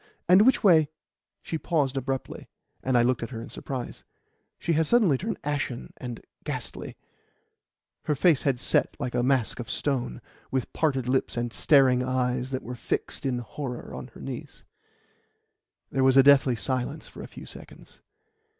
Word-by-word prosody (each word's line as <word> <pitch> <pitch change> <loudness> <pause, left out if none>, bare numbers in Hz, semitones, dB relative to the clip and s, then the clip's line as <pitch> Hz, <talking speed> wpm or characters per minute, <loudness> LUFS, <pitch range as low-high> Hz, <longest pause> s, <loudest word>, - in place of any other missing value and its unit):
and 185 +3 +7
which 260 -2 +4
way 160 -7 +6 0.3
" - - -63
She 160 - -3
paused 145 -6 0
abruptly, 135 0 -4 0.3
and 130 -1 +2
I 120 - +5
looked 125 +1 +1
at 115 - -4
her 115 -3 -6
in 115 - -8
surprise. 130 -3 -6 0.5
She 170 - -1
had 160 0 +2
suddenly 215 - +4
turned 205 - -3
ashen 140 -4 -3
and 120 -2 -7 0.2
ghastly; - - -5 1.1
her 150 - +1
face 155 0 +4
had 135 -4 0
set - - +1
like 130 -4 -3
a 120 - +1
mask 130 -2 +1
of 120 - -6
stone, 125 - -2 0.3
with 130 -3 -2
parted 135 -6 0
lips 130 -1 0
and 120 0 -2
staring 135 -4 +4
eyes 125 0 0
that 130 -1 -3
were 125 - -6
fixed 125 +2 -3
in 125 -2 0
horror 125 +1 -6
on - - -7
her - - -11
niece. - - -7 1.3
There 135 - +1
was 130 0 +5
a 135 - +9
deathly 140 -2 +6
silence 130 +6 -3
for - - -11
a - - -7
few - - -11
seconds. - - -14
130 Hz, 170 wpm, -27 LUFS, 125-145 Hz, 1.3 s, a